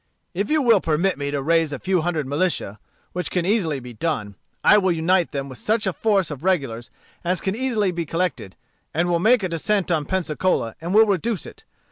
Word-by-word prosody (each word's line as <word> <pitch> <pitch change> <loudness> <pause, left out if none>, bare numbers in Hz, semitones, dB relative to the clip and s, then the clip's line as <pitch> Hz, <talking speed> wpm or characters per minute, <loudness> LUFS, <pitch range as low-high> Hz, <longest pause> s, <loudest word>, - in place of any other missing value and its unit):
If 200 +3 -2
you 305 -2 +2
will 230 -6 +5
permit 170 +5 +1
me 140 0 -2
to 140 -1 -2
raise 165 0 +2
a 140 - -3
few 185 +3 0
hundred 160 -3 -1
militia, 145 - -1 0.3
which 180 -3 -2
can 180 -2 -1
easily 180 -8 +1
be 125 -1 -10
done, 110 -6 -2 0.3
I 210 - +7
will 190 -2 +1
unite 170 +2 +1
them 140 -1 -3
with 130 -2 -10
such 220 0 0
a 190 - 0
force 195 -6 +1
of 145 0 -7
regulars 135 -11 -1 0.3
as 180 0 0
can 190 +1 -2
easily 225 -6 0
be 170 -2 -4
collected, 165 - -2 0.4
and 170 +2 +1
will 170 -1 +2
make 225 +4 +4
a 185 - -1
descent 180 +3 0
on 155 -3 +1
Pensacola, 175 - -1
and 175 +4 -2
will 220 +1 +8
reduce 205 0 -1
it. - - -13
175 Hz, 210 wpm, -22 LUFS, 150-195 Hz, 0.4 s, will